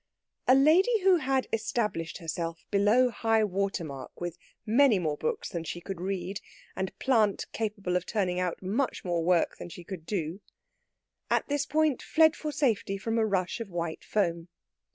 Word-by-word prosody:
A 255 - +7
lady 365 - +5
who 370 -1 +5
had 265 -3 0
established 215 -6 -1
herself 165 -1 -4
below 215 +5 +4
high 225 -1 +2
water 195 -2 -1
mark 140 -4 -8
with 175 -1 -4 0.3
many 235 0 +5
more 155 -5 -1
books 470 - -3
than 170 -3 -4
she 165 +2 -5
could 180 0 -7
read, 190 0 -3 0.3
and 190 0 -4
plant 220 -6 +2
capable 205 -5 -2
of 180 0 -1
turning 185 -5 0
out 180 0 -2
much 220 +7 -1
more 175 -2 0
work 175 0 +2
than - - -8
she 175 0 -10
could 170 -3 -8
do, 180 -1 -3 0.9
at - - +1
this 285 0 0
point 305 -2 +2
fled 320 0 +4
for 305 - -4
safety 225 -9 0
from 225 +3 -1
a 220 - +3
rush 185 -1 -1
of 230 -3 -5
white 170 -2 -4
foam. 170 -5 -1
200 Hz, 175 wpm, -29 LUFS, 175-245 Hz, 0.9 s, A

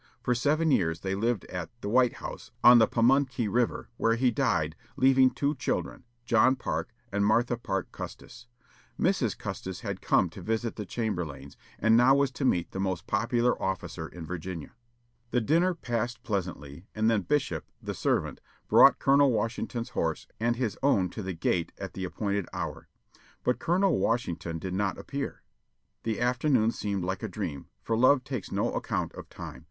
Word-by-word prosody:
For 125 - +2
seven 150 +6 +2
years 80 -8 +1
they 95 0 -2
lived 110 +1 0
at 90 -3 -5
"The - - -4
White 125 +2 +4
House," - - -8
on 120 0 +9
the 110 - +5
Pamunkey 130 0 +2
River, 120 +4 0
where 115 0 +2
he 125 +1 +2
died, 85 - 0 0.2
leaving 130 0 +5
two 140 +3 -1
children, 135 - -3 0.2
John 120 +3 +4
Parke 130 - -3 0.2
and 100 0 +1
Martha 120 +4 +3
Parke 95 -5 -3
Custis. 115 - -9 0.5
Mrs. - - +1
Custis 95 -1 -6
had 100 -3 -4
come 95 - +3
to 95 - -10
visit 115 +4 -2
the 105 -3 -6
Chamberlaynes, 85 - -4 0.2
and 110 +1 +4
now 125 +3 +6
was 140 -1 +2
to 135 +1 -3
meet 90 -8 +1
the 95 - -5
most 95 -3 -2
popular 120 +3 +1
officer 95 -3 -3
in 85 -1 -9
Virginia. 85 -1 -6 0.6
The 125 - +2
dinner 170 +9 +2
passed 120 -5 -3
pleasantly, 85 -5 -4
and 110 +1 +1
then 115 -2 +3
Bishop, 130 - -1
the - - -5
servant, - - -1 0.3
brought - - +7
Colonel 140 0 +4
Washington's 115 +1 -2
horse - - -2
and 120 +1 +1
his 120 -4 -2
own 100 -10 +3
to - - -6
the 95 -1 -4
gate 85 +1 0
at - - -6
the 95 - -4
appointed 100 0 -2
hour. - - -5 0.6
But 125 - +1
Colonel 180 -1 +2
Washington 85 -8 -1
did 90 +2 -5
not 95 0 0
appear. 140 0 -5 0.6
The 110 -1 -2
afternoon 125 -1 +2
seemed 100 -4 -3
like 95 +2 -2
a 110 - -2
dream, 85 -8 -5 0.2
for 115 - 0
love 130 +3 +5
takes 130 -6 -5
no - - 0
account - - -2
of - - -10
time. - - -8
115 Hz, 175 wpm, -28 LUFS, 95-125 Hz, 0.6 s, on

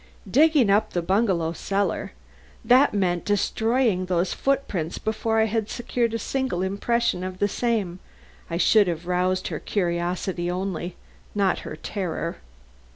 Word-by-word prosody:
Digging 280 - +4
up 215 +2 +2
the 175 - 0
bungalow 190 -4 +1
cellar! 195 - -2 0.5
That 255 +5 +6
meant 180 -4 0
destroying 220 -1 +1
those 180 0 +1
footprints 200 - -1
before 220 +1 -1
I 220 - +4
had 220 -1 -1
secured 235 -1 -1
a - - +1
single 255 -5 -2
impression 200 0 0
of 185 0 -5
the 205 - +2
same. 205 -5 -1 0.5
I 170 - -2
should 205 +2 +5
have 170 -1 -3
roused 180 +1 0
her - - -4
curiosity 175 -1 -1
only, 180 -1 -3 0.4
not 200 -2 +2
her - - -7
terror. 170 -1 -4
195 Hz, 140 wpm, -24 LUFS, 180-225 Hz, 0.5 s, That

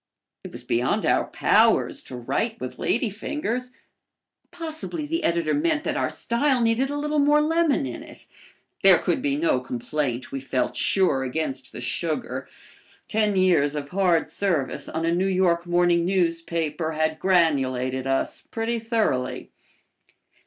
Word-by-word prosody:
It - - -8
was - - -10
beyond 120 +1 0
our - - +2
powers - - +2
to 130 - -8
write 135 - -2
with 130 - -6
ladyfingers. 245 +2 -2 0.8
Possibly 320 -1 -5
the 330 +3 -2
editor 170 - +1
meant 315 0 +1
that - - -2
our - - 0
style 255 +3 0
needed 235 +3 +1
a 290 - -3
little 300 +1 0
more 295 +1 +4
lemon 315 - +2
in 125 - -6
it. - - -14 0.6
There - - +7
could - - -1
be 140 -1 0
no 150 -3 +1
complaint, 125 0 -3
we 135 - -3
felt 130 -1 -2
sure, 185 -9 +2
against 160 - -3
the - - -8
sugar. - - -2 0.6
Ten 210 -2 +1
years 170 -6 +3
of 145 -1 -4
hard 180 -3 +1
service 170 -10 -1
on 160 +1 -2
a 165 - +1
New 185 +2 +1
York 180 -2 +1
morning 175 -1 +3
newspaper 165 -3 -1
had 155 0 -1
granulated 135 -8 +1
us 135 0 -1
pretty 230 +1 -2
thoroughly. 220 - -1
175 Hz, 145 wpm, -24 LUFS, 145-235 Hz, 0.8 s, There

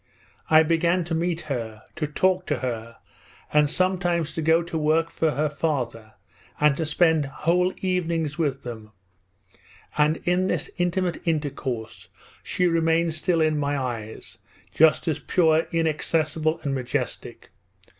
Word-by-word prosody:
I 155 0 +7
began 170 +2 +2
to 165 0 -4
meet 170 +1 -1
her, 115 -7 -5
to 150 - -1
talk 185 +4 +1
to 145 - 0
her, 115 -2 -4 0.6
and 150 -1 +4
sometimes 175 -2 0
to 160 - -3
go 160 +2 +3
to 170 0 -7
work 160 +1 +1
for 160 - +1
her 150 +2 +1
father 130 -8 -3 0.5
and 150 -1 +4
to 160 - -1
spend 160 -1 +3
whole 175 +6 +1
evenings 170 -5 -1
with 145 -5 -1
them, 110 -3 -8 1.1
and 150 +2 +3
in 180 +1 +2
this - - -2
intimate 175 0 0
intercourse 140 -7 -3 0.3
she 180 - -1
remained 165 -1 +2
still 165 +1 0
in 155 -1 +2
my 145 0 0
eyes 115 -5 -5 0.3
just 160 +1 +4
as 155 - 0
pure, 160 -2 +2
inaccessible, 160 0 0
and 140 -2 -1
majestic. 130 -3 -4
160 Hz, 140 wpm, -24 LUFS, 145-170 Hz, 1.1 s, I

